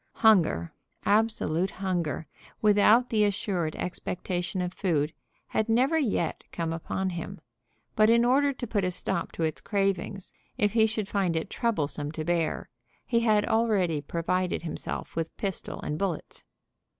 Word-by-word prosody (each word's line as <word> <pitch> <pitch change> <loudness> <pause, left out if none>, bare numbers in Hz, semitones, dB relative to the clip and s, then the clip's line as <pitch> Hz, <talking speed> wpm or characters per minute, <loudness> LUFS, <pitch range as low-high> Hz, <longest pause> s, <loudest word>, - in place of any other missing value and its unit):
Hunger, 170 - +4 0.3
absolute 205 -5 +2
hunger, 175 -6 -2 0.3
without 215 +3 +5
the 215 -2 +3
assured 190 -5 0
expectation 180 0 -3
of 180 0 -2
food, 160 -6 0 0.4
had 220 +1 0
never 260 +8 +3
yet 200 - -1
come 165 -1 -2
upon 185 +3 -2
him; 170 -1 -6 0.6
but 215 0 +5
in 235 +1 +5
order 280 +3 +4
to 255 -2 -5
put 210 -3 0
a 185 - +1
stop 175 -1 -2
to 165 - -2
its 155 -1 -1
cravings, 195 -2 -1 0.3
if 205 0 +2
he 220 -1 +5
should 215 -2 -2
find 195 -5 0
it 160 - -2
troublesome 150 - -1
to 155 -1 -4
bear, 170 -2 0 0.4
he 235 -2 +2
had 215 -3 +3
already 205 -9 +2
provided 175 +3 -1
himself 165 - -5
with 165 -1 -3
pistol 195 -5 -4
and 150 +1 -3
bullets. 190 -5 -3
190 Hz, 150 wpm, -28 LUFS, 165-220 Hz, 0.6 s, without